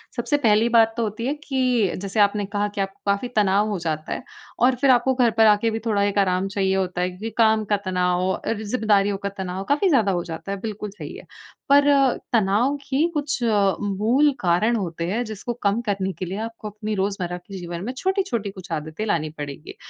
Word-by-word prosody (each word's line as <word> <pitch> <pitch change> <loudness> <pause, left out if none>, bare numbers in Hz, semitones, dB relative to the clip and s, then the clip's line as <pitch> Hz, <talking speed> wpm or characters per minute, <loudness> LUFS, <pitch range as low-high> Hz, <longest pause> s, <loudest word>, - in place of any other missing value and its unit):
सबसे 290 - 0
पहली 215 +2 +4
बात 225 0 +5
तो 235 - +1
होती 215 +2 -3
है 280 - +1
कि, 250 - +1
जैसे 200 +3 -3
आपने 205 0 +3
कहा 205 +1 -1
कि - - +1
आपको 195 0 -5
काफ़ी 200 +5 -1
तनाव 205 0 +3
हो 205 - -1
जाता 155 -1 -2
है, - - -6 0.4
और 250 +2 +4
फिर 275 - +4
आपको 250 +1 +3
घर 245 -3 +3
पर 225 - +6
आके 215 +1 +4
भी 225 - -2
थोड़ा 205 -3 +1
एक 205 0 0
आराम 185 0 +1
चाहिए 195 -1 0
होता 185 -2 -1
है 180 - +1
क्योंकि 195 +5 -6
काम 220 -1 +4
का - - +4
तनाव 180 -1 +1
और 210 +3 -2
ज़िम्मेदारियों 205 -3 +1
का - - +1
तनाव 190 0 -4
काफ़ी 300 +7 +3
ज़्यादा 225 - +3
हो 175 -2 -1
जाता 165 +3 -7
है, 200 - -2
बिल्कुल 210 -2 -5
सही - - -7
है। - - -12 0.4
पर 285 +1 +6 0.4
तनाव 225 +6 +2
की 285 +5 +2
कुछ 295 -2 -1
मूल 210 +5 +2
कारण 185 +7 +2
होते 170 -6 -3
हैं, 225 +7 -1
जिसको 215 +2 -5
कम 200 +2 +2
करने 195 -2 -1
के 185 - -2
लिए 190 +3 -5
आपको 225 -1 -6
अपनी 210 +1 -4
रोज़मर्रा 190 -3 -2
के 190 +2 -10
जीवन 175 -1 -6
में 245 - -3
छोटी-छोटी 375 - -1
कुछ 185 -2 -12
आदतें 155 +5 -4
लानी 165 -7 0
पड़ेगी। 145 +1 -7
205 Hz, 210 wpm, -23 LUFS, 190-230 Hz, 0.4 s, पर